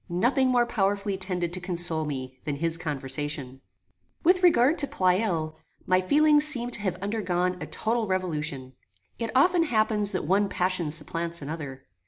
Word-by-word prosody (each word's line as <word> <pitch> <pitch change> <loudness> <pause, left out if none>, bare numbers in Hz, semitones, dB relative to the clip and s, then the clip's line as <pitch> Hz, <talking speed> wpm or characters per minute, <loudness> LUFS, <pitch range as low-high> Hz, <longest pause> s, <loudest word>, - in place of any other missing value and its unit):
Nothing 245 +10 +1
more 245 -1 +3
powerfully 200 -3 -1
tended 180 -2 -3
to 185 - -2
console 175 -3 -1
me 130 -3 -6
than 145 - -3
his 165 +3 +1
conversation. 140 -3 -4 0.6
With 365 +2 +4
regard 325 -4 +4
to 285 - +4
Pleyel, 180 -6 0 0.3
my 185 0 +2
feelings 295 +9 +4
seemed 245 -5 +4
to - - 0
have 190 -4 -2
undergone 180 -4 -1
a 155 - -5
total 225 0 -2
revolution. 155 -8 -3 0.5
It 230 -1 -3
often 345 +6 +4
happens 215 -7 +2
that 185 - -2
one 195 +4 +1
passion 180 -3 0
supplants 165 +2 -1
another. 140 -3 -7
185 Hz, 155 wpm, -26 LUFS, 155-225 Hz, 0.6 s, With